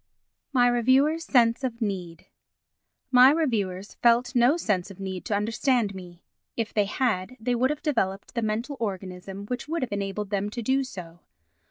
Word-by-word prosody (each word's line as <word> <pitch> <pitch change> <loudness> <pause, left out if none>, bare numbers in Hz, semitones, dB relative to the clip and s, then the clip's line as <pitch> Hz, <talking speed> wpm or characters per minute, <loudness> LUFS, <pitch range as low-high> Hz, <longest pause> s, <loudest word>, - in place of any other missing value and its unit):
My 245 -3 +4
Reviewers' 265 +7 +3
Sense 235 0 +3
of 240 -3 -3
Need 185 -7 -4 0.9
My 255 0 +8
reviewers 215 - -1
felt 240 +1 +3
no 250 +5 +4
sense 200 - -1
of 195 -1 -12
need 190 -2 -5
to 215 - 0
understand 225 +1 +1
me—if 185 +4 -8
they 210 -2 +2
had 220 0 -1
they 245 +3 -1
would 250 +2 +2
have 300 0 -4
developed 200 - -1
the 235 - -1
mental 230 +6 -2
organism 195 -2 -5
which 245 +4 -4
would 325 -2 -2
have 250 - -4
enabled 200 0 -3
them 200 0 -1
to 235 +2 -5
do 265 +4 +2
so. 175 -9 -9
225 Hz, 165 wpm, -26 LUFS, 195-255 Hz, 0.9 s, My